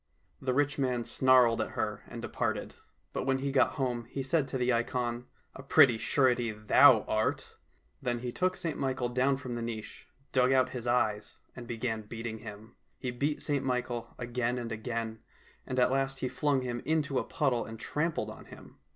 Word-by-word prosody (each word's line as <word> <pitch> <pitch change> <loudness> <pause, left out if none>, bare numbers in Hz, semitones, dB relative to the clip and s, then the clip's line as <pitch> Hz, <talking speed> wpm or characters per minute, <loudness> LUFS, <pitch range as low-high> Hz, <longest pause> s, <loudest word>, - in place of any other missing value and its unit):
" 90 0 -40
The 130 -1 0
rich 145 0 +1
man 125 -3 0
snarled 125 -1 +4
at - - -4
her - - -2
and - - -8
departed, - - -2 0.4
but - - -2
when 135 0 +3
he 135 +1 -2
got 135 -1 +3
home 125 -4 -2
he 135 +3 -5
said 145 +1 +1
to 130 - -3
the 125 0 +2
ikon, 120 0 -1
" - - -37
A - - -8
pretty 130 -3 +5
surety 125 -3 +2
thou 110 +3 +6
art! 110 0 -1 0.2
" - - -40
Then 120 -1 -1
he 125 -1 -3
took 185 +7 0
St 165 -4 -3
Michael 130 -2 -1
down 130 +2 +2
from 130 -2 -6
the 120 - -3
niche, 115 -2 -6 0.2
dug 130 0 +3
out 130 -1 +4
his 125 -2 -6
eyes, 105 -4 0 0.2
and 120 -2 -9
began 115 -1 -2
beating 110 +1 -6
him. 110 +1 -10 0.2
He 125 - -3
beat 145 +5 -1
St 145 -2 0
Michael 125 -2 -2
again 120 0 -1
and 120 -1 -4
again, 110 0 -4 0.5
and 130 - -3
at 125 0 +4
last 135 0 0
he 130 - 0
flung 135 +2 +1
him 120 -1 -3
into 145 -3 +1
a - - -2
puddle 130 -5 0
and 110 0 -9
trampled 160 +6 -2
on - - -12
him. - - -14
125 Hz, 200 wpm, -30 LUFS, 115-135 Hz, 0.5 s, thou